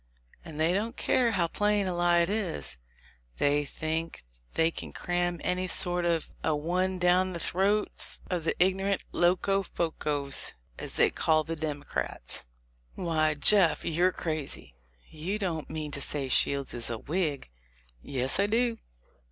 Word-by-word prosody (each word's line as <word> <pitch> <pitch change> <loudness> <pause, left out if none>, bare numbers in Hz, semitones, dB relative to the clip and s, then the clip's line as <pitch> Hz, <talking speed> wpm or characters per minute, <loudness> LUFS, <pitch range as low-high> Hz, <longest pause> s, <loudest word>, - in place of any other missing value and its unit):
And 155 -2 -9
they 160 +3 +3
don't 220 +5 -2
care 240 -3 +2
how 180 -4 +2
plain 205 +2 +1
a 185 -2 -2
lie 175 0 +3
it 170 - +1
is: 115 - -1 0.6
they 145 +1 +2
think 160 +3 -4 0.3
they 165 0 +3
can - - -7
cram 175 -1 -1
any 185 +1 0
sort 175 -1 +1
of 170 -2 0
a 155 - +1
one 180 +5 0
down 180 +1 +3
the 170 - -4
throats 200 +5 +1
of 180 -3 -2
the 165 - 0
ignorant 195 +2 +1
Locofocos, 170 -6 0 0.3
as - - -6
they - - +4
call 155 -1 +2
the 165 +2 -4
Democrats." 145 - -4 0.5
"Why, 155 -3 +1
Jeff, 175 +3 +5
you're 175 +3 +2
crazy: 155 - -3 0.4
you 170 +7 -3
don't 175 -7 -3
mean 155 -1 -4
to 140 - -1
say 140 -1 -1
Shields 140 +1 +2
is 120 -1 -3
a 115 - -3
Whig!" 150 - -2 0.5
"Yes, 130 - 0
I 200 - +3
do." 230 +1 +1
170 Hz, 150 wpm, -29 LUFS, 155-185 Hz, 0.6 s, Jeff